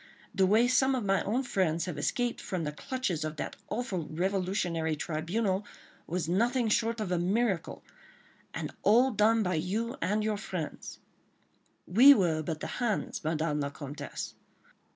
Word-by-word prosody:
The 190 -2 +3
way 220 +5 +4
some 265 +1 +3
of 245 -5 -2
my 195 0 +2
own 240 +6 0
friends 170 -8 0
have 180 -4 -4
escaped 240 - -1
from 180 -3 -3
the 150 - -2
clutches 190 - -3
of 155 0 -4
that - - -5
awful 210 -8 -3
revolutionary 175 -2 -1
tribunal 185 +6 -1 0.4
was 170 -1 -2
nothing 235 +6 +1
short 230 +1 +1
of 205 -4 -3
a 180 - +1
miracle—and 195 0 -4
all 245 +5 +5
done 220 +1 +3
by 180 -1 0
you 200 +8 -2
and 210 +3 +1
your 215 -1 0
friends—" 185 -5 -6 0.9
"We 255 +10 +8
were 165 -7 +1
but 155 0 -4
the - - -3
hands, 235 -7 -1
Madame 155 -1 0
la 140 -1 -1
Comtesse 145 0 -7
190 Hz, 150 wpm, -30 LUFS, 165-225 Hz, 0.9 s, We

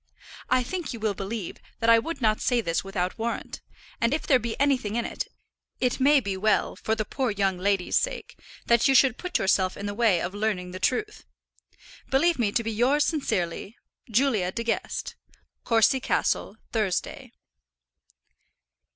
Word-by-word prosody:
I 255 0 +3
think 350 +5 -4
you 230 - -7
will 215 -1 0
believe 195 0 -5 0.2
that 230 - 0
I 230 - +7
would 315 +4 -5
not 215 -1 +2
say 245 -2 +2
this 170 -7 -1
without 195 +1 -3
warrant, 230 +1 -4 0.4
and 230 +5 +2
if 315 - -4
there 260 -3 +4
be 230 -1 -4
anything 260 -7 +1
in 235 - 0
it, - - -4 0.5
it 250 0 0
may 285 +2 +5
be 200 -6 -3
well, 215 +3 +1
for 220 - -1
the 215 -1 -2
poor 260 +3 -2
young 195 -3 0
lady's 195 -1 +1
sake, - - -4 0.3
that 235 +3 +4
you 270 - +3
should 255 -2 +4
put 360 -1 -1
yourself 190 -1 +1
in 200 - -6
the 205 - -3
way 210 -5 +3
of 180 - -3
learning 205 -4 -2
the 185 - -7
truth. 420 - -1 0.9
Believe 315 +3 +2
me 215 -4 +1
to 230 - 0
be 225 - -2
yours 260 +7 +2
sincerely, 210 - -2 0.3
JULIA 220 -6 +2
DE 230 - -3
GUEST. 230 -1 -2 0.5
Courcy 230 +3 +3
Castle, 220 -4 -1
Thursday. 210 -5 -2
225 Hz, 170 wpm, -26 LUFS, 200-260 Hz, 0.9 s, I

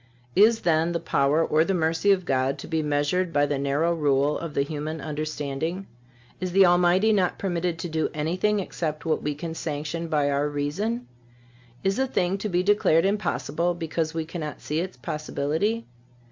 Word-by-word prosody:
Is, 225 +3 +5
then, 165 0 +2
the 170 - 0
power 155 0 +2
or 155 +1 +3
the 195 +3 0
mercy 165 +4 +2
of 185 -2 +2
God 135 -1 +1
to - - -8
be 160 -1 0
measured 150 +5 0
by 145 -2 +3
the 145 -1 -1
narrow 145 +5 +1
rule 145 -2 +2
of 165 -3 -6
the 140 - +3
human 155 +2 -4
understanding? 155 +4 -3 0.5
Is 185 -1 -3
the 195 0 +7
Almighty 180 +4 +4
not 185 -4 +1
permitted 175 -3 -1
to 165 - -4
do 160 -1 -1
anything 180 +8 0
except 160 -5 -4
what 160 - 0
we 150 0 -2
can 160 +2 -5
sanction 160 +1 -4
by 145 -3 +1
our 140 +1 +1
reason? 190 +12 -2 0.8
Is 195 +4 +1
a 265 - +2
thing 190 -4 0
to 210 - -3
be 180 -1 +1
declared 190 -5 +3
impossible 175 -4 0
because 165 -1 -2
we 160 -1 -1
cannot 155 -2 -6
see 150 +2 -2
its 180 -4 -4
possibility? 155 - -2
165 Hz, 180 wpm, -25 LUFS, 150-180 Hz, 0.8 s, the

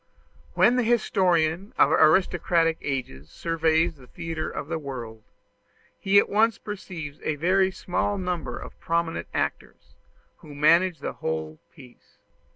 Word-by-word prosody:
When 245 - +4
the 250 - +2
historian 185 -5 +1
of - - +5
aristocratic 165 0 +3
ages 100 - -4
surveys 165 0 +1
the 125 -2 -16
theatre 165 +2 -5
of 145 - -6
the 165 0 -3
world, 120 -6 -7 0.8
he 195 +1 +3
at - - +5
once 220 +2 +2
perceives 175 -8 -7
a 155 - -1
very 190 +5 +2
small 190 +2 -2
number 175 -9 -3
of - - -10
prominent 170 0 -2
actors, - - -4 0.4
who 150 -2 -13
manage 165 +2 +3
the - - -4
whole 80 -1 -4
piece. 125 -3 -18
165 Hz, 135 wpm, -25 LUFS, 145-185 Hz, 0.8 s, of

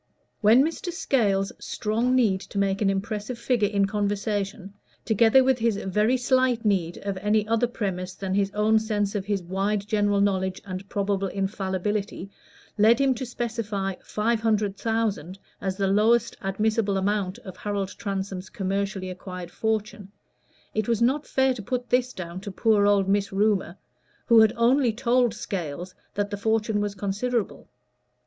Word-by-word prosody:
When 225 +5 +6
Mr. 330 +3 -3
Scales's 200 - +1
strong 230 +4 0
need 210 -7 +2
to 200 - -9
make 195 0 +1
an 200 - +3
impressive 210 +4 -3
figure 235 -3 +1
in 200 -1 +2
conversation, 205 0 -2 0.3
together 225 +4 +5
with 260 -1 +2
his 225 -2 +1
very 210 +6 +1
slight 250 -2 +1
need 180 -5 +1
of 200 -1 -2
any 210 +2 +1
other 230 +2 +2
premise 190 -5 -4
than 190 -1 -3
his 195 0 +2
own 215 +1 +3
sense 210 -2 -1
of 200 -3 -3
his 200 -3 -1
wide 195 +3 -1
general 205 -1 +2
knowledge 190 -2 +1
and 190 +1 -7
probable 200 -1 -1
infallibility, 195 +1 -3 0.5
led 220 +3 +6
him 275 -1 +3
to 250 +1 -5
specify 220 -5 -3
five 225 +2 0
hundred 210 -3 +1
thousand 210 -6 -2 0.2
as 190 -1 -2
the 200 - 0
lowest 215 +5 +3
admissible 210 +1 0
amount 195 -1 -1
of 185 - -9
Harold 200 -2 -2
Transome's 195 -2 -5
commercially 195 -1 -2
acquired 180 -1 -8
fortune, 215 -1 -2 0.6
it 215 -1 -1
was 230 -2 +1
not 275 +5 +1
fair 265 0 +2
to 240 - -7
put 245 +3 -4
this 250 0 +2
down 180 -2 -7
to 200 - -6
poor 205 0 +3
old 200 -2 +3
Miss 200 0 +1
Rumor, 195 -3 +1 0.5
who 230 -2 +6
had 220 -1 +6
only 240 +1 +3
told 240 -1 +2
Scales 180 -4 -5 0.2
that 205 +1 -1
the 205 - -3
fortune 220 0 0
was 205 -1 -2
considerable. 200 - -2
205 Hz, 160 wpm, -25 LUFS, 195-225 Hz, 0.6 s, When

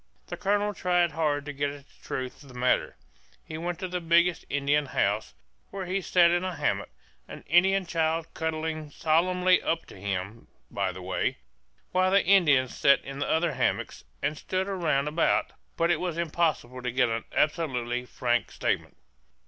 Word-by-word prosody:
The - - -6
colonel 205 +1 0
tried 175 -3 +1
hard 145 -2 0
to 145 - -5
get 145 +1 -1
at 140 0 -11
the - - -26
truth 130 -1 -5
of 140 - -15
the 125 - -11
matter; 125 +1 +1 0.5
he - - -7
went 175 0 -3
to 185 - -4
the 180 0 -3
biggest 170 +1 +3
Indian 145 +1 +1
house, 100 - -1 0.3
where 195 -1 -5
he 190 +2 -1
sat 175 -1 +4
in 175 +1 +1
a 185 -2 -3
hammock - - -1 0.4
an - - -10
Indian 190 +4 +4
child 165 -1 0
cuddling 155 -1 -3
solemnly 180 +5 +2
up 165 0 -1
to - - -13
him, 100 +3 -4 0.2
by 100 -2 -1
the 90 0 -9
way 95 - -1 0.5
while 185 0 +3
the 195 +1 +3
Indians 150 -10 +4
sat 140 0 +4
in 135 +1 -6
other 160 +1 +1
hammocks, 130 - -1 0.2
and 150 +1 -1
stood 185 0 -2
round 165 -8 0
about; 155 +3 +1 0.3
but 170 +1 +2
it 165 - +1
was 175 -2 -3
impossible 155 -7 -1
to 125 - -2
get 125 0 +3
an 115 0 -2
absolutely 125 -6 0
frank 120 -1 -1
statement. - - -2
160 Hz, 175 wpm, -27 LUFS, 130-175 Hz, 0.5 s, sat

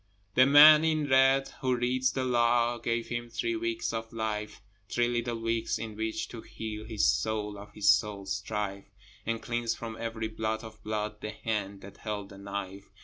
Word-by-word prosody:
The 130 +4 +6
man 150 +2 +9
in 155 -2 +1
red 135 0 +4
who 130 -2 +2
reads 125 +1 +1
the 130 - -1
Law 120 -1 +2
Gave 115 0 -2
him 120 0 -4
three 115 0 -2
weeks 115 0 -2
of 115 0 -4
life, 110 -2 -3 0.3
Three 120 0 +1
little 120 -1 -1
weeks 115 0 -1
in 110 -2 -6
which 110 +1 -3
to 115 - -8
heal 110 -1 -7
His 110 -2 0
soul 105 -1 0
of 100 +1 -11
his 105 - -2
soul's 100 +4 +2
strife, 100 -2 -4 0.4
And 115 -1 -2
cleanse 120 -1 -1
from 115 -1 -6
every 115 -1 -3
blot 110 0 -3
of 110 -1 -11
blood 105 0 -3
The 105 - -4
hand 105 -2 -3
that 100 0 -12
held 105 -2 -5
the 100 -2 -12
knife. 100 0 -6
115 Hz, 185 wpm, -29 LUFS, 105-120 Hz, 0.4 s, man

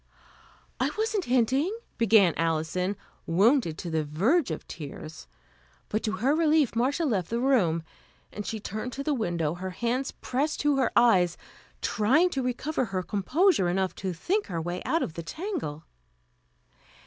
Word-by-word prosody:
"I - - +2
wasn't 435 -2 0
hinting," 260 - +1 0.2
began 210 -6 +5
Alison, 165 +4 -1 0.3
wounded 195 - +3
to 170 - -5
the 160 -1 +1
verge 210 - +1
of 160 - -5
tears; 155 0 -8 0.6
but 215 - -1
to 215 - -2
her 260 +6 +1
relief, 310 -5 +3
Marcia 275 +8 +1
left 200 - 0
the 235 - -1
room, 200 -12 +2 0.5
and 210 - -5
she 220 +1 -4
turned 215 +4 -5
to 275 - -4
the 300 - 0
window, 170 - -1
her 185 +2 -5
hands 240 +7 -1
pressed 285 +5 -2
to 295 -2 +2
her 260 -3 +2
eyes, 185 -8 +4 0.5
trying 270 +12 +3
to 270 - -1
recover 255 +3 -1
her 190 -3 -3
composure 210 - +2
enough 190 +1 0
to 190 -1 -3
think 375 - -1
her 170 -3 -3
way 175 +2 -4
out 330 +1 +1
of 160 - -4
the 170 - -5
tangle. 170 - -5
225 Hz, 160 wpm, -27 LUFS, 175-275 Hz, 0.6 s, began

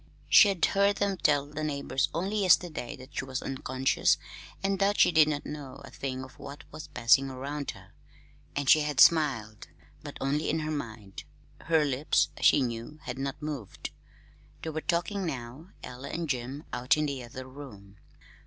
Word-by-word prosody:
She - - +8
had 195 -4 +2
heard 200 0 +2
them 200 -1 0
tell 145 -4 +2
the 150 +1 -6
neighbors 140 -3 -1
only 195 +5 -1
yesterday 175 -9 +2
that 130 +3 -14
she - - -1
was 130 0 -4
unconscious 130 0 +1 0.5
and 195 -1 0
that 200 +1 +2
she - - +6
did 160 -2 +6
not 145 -1 -2
know 145 -3 -7
a - - -12
thing 130 -1 -4
of 130 0 -13
what 140 +1 -9
was 155 -1 -8
passing 125 +2 +3
around 140 +2 -5
her; 95 0 -9 0.6
and 145 -1 -2
she 155 - +7
had 150 -2 -2
smiled 135 -10 +4 0.3
but - - -8
only 145 +3 0
in 160 +1 0
her 155 0 -3
mind. 110 -9 -6 0.4
Her 160 -2 +3
lips, 140 +1 +1
she 140 - +5
knew, 120 +4 -5
had 125 +1 -5
not 135 0 -3
moved. 145 -10 -5 0.7
They 160 - -3
were 155 0 -3
talking 180 +5 -1
now 135 +1 -6
Ella 125 +3 -8
and 170 0 -3
Jim 130 +2 -3
out 125 +4 +2
in 150 - +1
the 140 -3 -3
other 130 +2 -9
room. 105 -8 -12
140 Hz, 180 wpm, -29 LUFS, 130-155 Hz, 0.7 s, She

